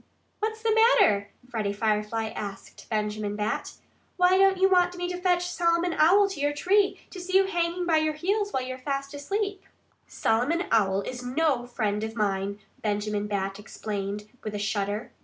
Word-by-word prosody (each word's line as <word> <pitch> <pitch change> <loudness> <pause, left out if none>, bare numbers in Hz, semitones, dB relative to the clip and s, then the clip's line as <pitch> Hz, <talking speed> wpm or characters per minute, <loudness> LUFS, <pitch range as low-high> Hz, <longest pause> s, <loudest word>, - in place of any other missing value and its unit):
"What's 440 +1 -3
the 450 -1 +3
matter?" 320 - +4 0.2
Freddie 215 -5 -2
Firefly 215 +1 -1
asked 200 -3 -8
Benjamin 210 -1 -2
Bat. 210 +1 -2 0.4
"Why 360 0 +5
don't 385 0 +5
you 380 +1 +5
want 360 -1 +3
me 355 0 -2
to 360 0 -5
fetch 355 -1 +2
Solomon 340 0 +1
Owl 380 +7 +5
to 385 - -6
your 290 +1 +1
tree, 390 +6 +2
to 375 - -8
see 370 +1 +2
you 390 - +4
hanging 350 -1 -1
by 330 -2 +3
your 310 -1 +1
heels 405 +6 0
when 260 -5 -1
you're 255 0 -6
fast 275 +1 -3
asleep?" 395 +7 -3 0.5
"Solomon 260 +11 +1
Owl 195 -3 +3
is 250 +4 -6
no 255 -1 0
friend 215 -4 -1
of 220 +1 -4
mine," 200 -2 -1 0.2
Benjamin 210 0 -1
Bat 195 -1 -2
explained 210 -1 -5 0.2
with 215 -1 -4
a - - -1
shudder. 205 +1 -2
260 Hz, 175 wpm, -27 LUFS, -, 0.5 s, Why